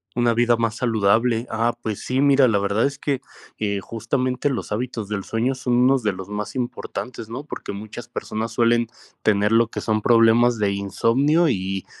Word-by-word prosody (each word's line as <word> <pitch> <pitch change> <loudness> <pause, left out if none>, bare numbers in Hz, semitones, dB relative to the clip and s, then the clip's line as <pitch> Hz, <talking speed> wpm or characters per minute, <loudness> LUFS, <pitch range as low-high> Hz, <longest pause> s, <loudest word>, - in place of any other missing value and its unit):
Una 120 -1 +2
vida 120 0 +3
más 115 0 -1
saludable, 115 0 +2
ah, 115 +2 +1
pues 110 -2 -3
sí, 130 +2 0
mira, 140 -2 +5
la 110 -4 +2
verdad 100 +4 +1
es 140 0 -2
que, 140 -2 -2 0.4
eh, 100 -2 -1
justamente 125 +6 -1
los 125 -5 -4
hábitos 110 -2 -3
del 100 -2 -3
sueño 120 +4 -1
son 125 -1 -2
unos 125 +1 +4
de 105 -3 0
los 95 +1 -8
más 105 +4 -5
importantes, 120 -2 -5
¿no?, 130 +5 -6
porque 145 - -7
muchas 110 +4 -8
personas 110 -1 -4
suelen 120 0 +2 0.3
tener 105 0 +2
lo 115 0 +4
que - - -6
son 110 -1 0
problemas 115 +1 +4
de 100 -1 +1
insomnio 130 - +2
y, 95 -3 -2
115 Hz, 185 wpm, -22 LUFS, 105-125 Hz, 0.4 s, mira